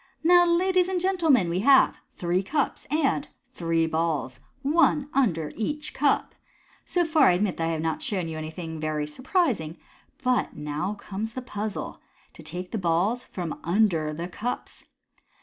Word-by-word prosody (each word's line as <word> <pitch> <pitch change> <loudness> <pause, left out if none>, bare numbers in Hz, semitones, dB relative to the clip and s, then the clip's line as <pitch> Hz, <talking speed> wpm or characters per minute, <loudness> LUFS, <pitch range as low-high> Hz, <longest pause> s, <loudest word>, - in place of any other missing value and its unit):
"Now, 350 +1 +6
ladies 365 +1 +3
and 370 -1 0
gentlemen, 330 - +3
we 170 +2 -1
have 270 +6 +5
three 175 +1 0
cups 280 +8 -2
and 290 -1 +1 0.3
three 165 -5 +1
balls, 160 -5 -1 0.2
one 295 -1 +3
under 170 - +1
each 295 +7 -3
cup. 280 0 +1 0.5
So 350 -1 +1
far, 310 -4 +4
I - - +4
admit 190 +1 0
that 165 - 0
I - - 0
have 160 0 -2
not 160 -1 -1
shown 185 -5 -2
you 160 - -5
anything 160 +1 -6
very 155 -1 -1
surprising, 230 - -1 0.5
but 250 -1 +1
now 150 +7 -3
comes 210 +2 -5
the 255 - -4
puzzle, 210 -3 -5 0.3
to - - -13
take 180 +1 -6
the 225 - -2
balls 190 +8 +1
from 175 -4 -5
under 170 -4 +2
the 165 +3 -5
cups. 230 +7 -5
205 Hz, 160 wpm, -26 LUFS, -, 0.5 s, Now